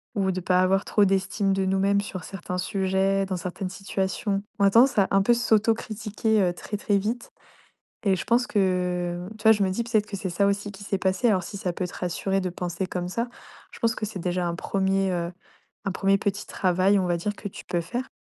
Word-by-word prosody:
ou 195 -2 +1
de 185 - -2
pas 180 +1 +3
avoir 195 +2 +2
trop 205 -2 +3
d'estime 195 +1 +1
de 190 0 0
nous-mêmes 195 +1 +2
sur 185 -4 -6
certains 180 -1 -5
sujets, 195 0 +1
dans 185 -1 -2
certaines 185 +2 -4
situations. 195 +1 -2 0.2
On 200 - +5
a 195 - +5
tendance 240 +2 +5
à 195 - +5
un 195 0 +4
peu 240 +5 +4
s'auto-critiquer, 220 -1 +1
heu, 180 -2 +2
très, 210 +4 -5
très 205 0 +1
vite. 225 +5 -3 0.7
Et 195 -3 +3
je 180 - -4
pense 240 +2 +2
que, 180 -3 0
tu 210 - -14
vois, 220 - +8
je 210 -2 +3
me 190 - +1
dis 235 +5 -1
peut-être 215 -3 +1
que 200 - -5
c'est 190 0 -3
ça 200 +3 +2
aussi 200 0 -1
qui 200 +1 -11
s'est 195 -1 -1
passé. 190 +5 +1
Alors 185 -4 +2
si 200 - -7
ça 180 -2 -2
peut 180 - -2
te - - -12
rassurer 190 +2 -1
de 185 - -2
penser 180 +1 -3
comme 180 -1 -3
ça, 235 +5 -2 0.4
je - - -12
pense 230 -2 +2
que 215 - -3
c'est 200 -3 -6
déjà 180 0 -1
un 170 - -2
1er, 195 +1 0
heu, 170 0 -2 0.5
un 195 - 0
1er 195 +1 +2
petit 200 0 -2
travail, 185 +1 +2
on 185 - 0
va 175 - +1
dire, 205 +5 -3
que 205 - -6
tu - - -11
peux 175 -1 -1
faire. 240 +10 -4
195 Hz, 235 wpm, -25 LUFS, 185-205 Hz, 0.7 s, vois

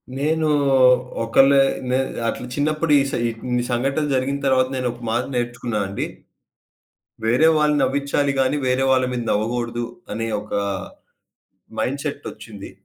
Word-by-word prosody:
నేను 155 +3 0 0.7
ఒకలే 135 +4 +5 0.3
నె 130 - +2 0.3
అట్లా 125 - -3
చిన్నప్పుడు 155 +2 0
ఇ - - +5
సే - - -2
ఇన్ని 120 +2 -2
సంఘటనలు 135 +5 0
జరిగిన 135 +2 0
తర్వాత 130 -1 +3
నేనొక 125 -2 -3
మాట 120 +2 +1
నేర్చుకున్నానండి. 120 -5 -2 1.2
వేరే 125 +8 +4
వాళ్ళని 150 -1 +2
నవ్వించాలి 140 0 0
గాని, 135 +2 +2
వేరే 130 +1 +2
వాళ్ళ 130 -1 +3
మీద 125 -1 -2
నవ్వగూడదు 120 +2 -1 0.3
అనే 115 +1 -3
ఒక 105 - -10 1.3
మైండ్‌సేట్ 140 +4 -3
ఒచ్చింది. 110 -2 -11
130 Hz, 120 wpm, -21 LUFS, 120-140 Hz, 1.3 s, ఒకలే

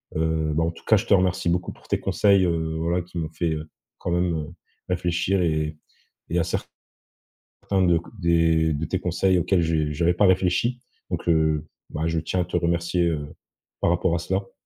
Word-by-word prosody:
Heu, 80 -1 0
bah, 80 - +2
en 85 - 0
tout 85 - -16
cas, 110 - +5
je 105 - -2
te - - +4
remercie 90 -2 +2
beaucoup 90 +1 -1
pour - - -21
tes - - +1
conseils, 100 -3 +3
heu, 80 -2 -1
voilà, 85 +2 0
qui 90 +1 -10
m'ont 80 -2 -1
fait, 80 +1 -2
heu, 80 0 -6 0.3
quand 85 - -4
même, 85 0 +1
heu, 75 - -4 0.4
réfléchir 90 +1 0
et 75 -2 0 0.5
et 85 - +1
à 85 - +2
certains, 85 - -6 1.0
de 85 -1 +4 0.2
des 80 -2 +3
de 75 +1 -2
tes 95 - -2
conseils 90 +1 +2
auxquels 85 +1 +2
j 80 -2 0
j'avais 85 +3 +2
pas 100 +3 +4
réfléchi. 95 +7 +2 0.3
Donc, - - -3
heu, 80 -2 +2 0.2
bah, 80 +1 -2
je 80 0 0
tiens 90 +3 -1
à - - -2
te 90 - -3
remercier, 85 0 +1
heu, 75 -3 -2 0.5
par - - +2
rapport 85 0 +1
à - - +1
cela. 95 +3 -3
85 Hz, 200 wpm, -24 LUFS, 80-90 Hz, 1.0 s, cas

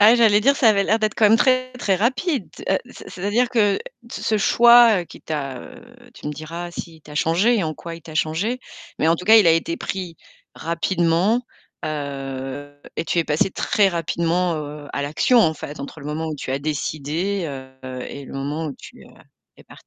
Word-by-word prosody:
Ah 215 +3 +8
j'allais 220 -3 +5
dire 275 +6 +4
ça 255 -4 +4
avait 200 -2 +4
l'air 220 +3 +2
d'être 215 -1 0
quand 220 - +3
même 220 - +6
très, 255 +1 +2
très 205 -6 0
rapide. 255 - 0 0.2
Heu, 190 - +3
c - - -12
c'est-à-dire 205 +7 0
que 215 -5 +2
t - - -10 0.4
ce 215 - +1
choix, 235 -1 +6
heu, - - -6
qui - - -14
t'a, 140 -4 -4
heu, - - -12 0.3
tu - - -10
me - - -3
diras 165 +4 -7
si 170 -1 -8
il - - -20
t'a 150 0 -13
changée 185 +11 +3
et 190 - 0
en 155 -1 -3
quoi 165 +2 -8
il 165 - -15
t'a 155 - -11
changée 170 +11 -1 0.4
mais 160 - +2
en 165 - +4
tout 180 - -8
cas 220 +3 +8
il 215 -5 +6
a - - +7
été 165 +1 +1
pris 180 -4 -5 0.4
rapidement, 170 +6 +1 0.4
heu 140 -1 -5 0.2
et - - -1
tu 170 - -1
es 170 - +3
passée 155 +5 +1
très 200 +1 +2
rapidement, 170 0 0
heu, 150 -1 -6
à 140 - -2
l'action 155 - +3
en 160 -6 +3
fait, 145 -1 -8
entre 140 +3 -8
le 145 - -8
moment 155 +2 -3
où 155 - -4
tu 130 - -4
as 135 - 0
décidé, 155 +6 -2 0.4
heu 130 -1 -6
et 140 - -8
le - - -11
moment 145 +4 -3
où 145 - -5
tu, - - -13
heu, - - -17 0.5
es - - -17
partie. - - -17
170 Hz, 220 wpm, -22 LUFS, 150-215 Hz, 0.5 s, Ah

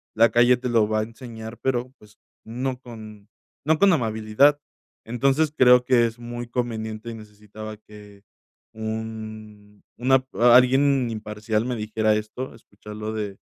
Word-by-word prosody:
la 115 +1 +5
calle 120 +2 +5
te 125 - -4
lo 115 -3 +3
va 110 0 +1
a - - -1
enseñar, 115 -1 -9
pero, 130 0 -1
pues, 105 -1 -20 0.3
no 125 +3 -3
con 110 -3 -12 0.4
no 155 +1 +2
con 200 -2 +5
amabilidad. 115 +3 +2 0.5
Entonces, 135 +6 +1
creo 125 -1 +6
que 125 -2 +4
es 115 +1 -9
muy 120 0 -7
conveniente 110 -2 -4
y - - -7
necesitaba 105 0 -10
que 105 -1 -16 0.5
un 110 -1 -7 0.2
una 130 +2 +3
p 130 - -19
alguien 125 +1 +5
imparcial 105 0 -3
me 125 0 -2
dijera 110 0 0
esto, 110 +5 -5
escucharlo 105 0 -9
de 105 -3 -4
110 Hz, 145 wpm, -24 LUFS, 110-125 Hz, 0.5 s, creo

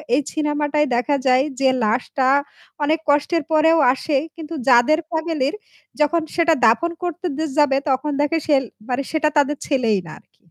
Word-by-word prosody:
এই 285 - +2
সিনেমাটায় 300 -1 0
দেখা 250 +4 0
যায় 255 +1 +4 0.2
যে 270 -1 +3
লাশটা 250 +5 0 0.6
অনেক 310 +2 +1
কষ্টের 295 +3 +1
পরেও 320 +1 +4 0.2
আসে। 280 +2 -1 0.2
কিন্তু 325 -1 -8 0.2
যাদের 250 +6 +5
ফ্যামিলির 320 -3 -2 0.5
যখন 300 +3 +2
সেটা 335 -1 +3
দাফন 285 +10 +3
করতে 350 +1 -4
দে 320 - -1
যাবে 285 -2 +3
তখন 270 +3 0
দেখে 295 +3 +1
সেল 280 -3 +3 0.3
মানে 250 +2 -1
সেটা 310 -1 +1
তাদের 290 0 +2
ছেলেই 235 -8 +1
না - - -9
আরকি। - - -33
295 Hz, 160 wpm, -20 LUFS, 265-315 Hz, 0.6 s, যাদের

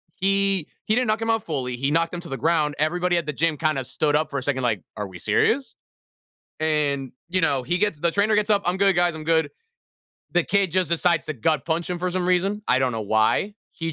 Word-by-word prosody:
He 195 -3 +2 0.2
he 215 - +2
didn't 250 -1 +1
knock 215 +1 0
him 225 - -2
out 225 -1 +1
fully, 130 -6 -3
he 135 +3 -1
knocked 165 +2 +1
him 175 - -4
to 170 - -10
the 135 - -4
ground, 155 -2 +1
everybody 175 +3 +1
at 170 - -1
the 150 - -3
gym 160 +1 0
kinda 155 -5 0
stood 145 +3 0
up 155 +1 +1
for 140 - -2
a - - -7
second 130 -2 -1
like, 110 -7 0 0.2
"Are 105 -2 -3
we 90 -2 -11
serious?" 270 - +1 0.9
And, 145 -4 +1 0.2
you 185 +1 0
know, 140 -5 +2
he 175 +8 -1
gets 205 -7 0
the 170 +1 +2
trainer 205 +4 +2
gets 210 0 +1
up, 205 -1 +3
"I'm 180 +1 +1
good, 195 -1 +3
guys, 175 -2 +2
I'm 160 - -7
good." 160 0 +2 0.8
The 175 - +3
kid 195 -2 +1
just 185 0 +1
decides 170 -3 +1
to 155 - -2
gut 150 +4 0
punch 165 +1 -1
him 175 - -2
for 180 +1 -2
some 180 0 -1
reason. 195 +3 +1
I 125 - +3
don't 130 -2 +1
know 110 -1 -3
why. 110 - +1 0.2
He 165 -1 -4
165 Hz, 245 wpm, -23 LUFS, 145-185 Hz, 0.9 s, up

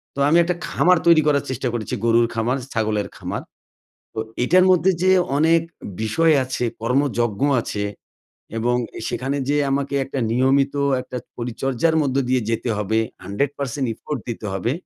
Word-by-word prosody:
তো - - -5
আমি 165 - +5
একটা 180 +1 -1
খামার 180 0 +3
তৈরি 165 -2 +7
করার 145 -2 +3
চেষ্টা 130 0 -2
করেছি, 120 0 -4
গরুর 115 0 +4
খামার, 115 +3 0 0.2
ছাগলের 105 -3 -1
খামার। - - -4 0.7
তো - - -4 0.2
এইটার 180 +8 +5
মধ্যে 185 +1 +4
যে 185 - +5 0.3
অনেক 165 +2 +4 0.4
বিষয় 160 +9 +3
আছে, 130 -1 -3 0.2
কর্মযজ্ঞ 130 +2 0 0.4
আছে, 105 -2 -4 0.7
এবং 120 +2 +1 0.3
সেখানে 135 +2 -2
যে 145 - +2
আমাকে 140 0 -1
একটা 135 0 -4
নিয়মিত 135 +3 +2 0.3
একটা 125 - -7 0.2
পরিচর্যার 130 +6 -1
মধ্য 135 -3 -1
দিয়ে 130 -1 +2
যেতে 115 +2 -1
হবে, 105 +2 0 0.3
hundred 115 +9 -1
percent 140 0 -2
effort 140 +5 -5
দিতে 115 -2 -5
হবে, 95 +5 -1
130 Hz, 155 wpm, -21 LUFS, 115-145 Hz, 0.7 s, তৈরি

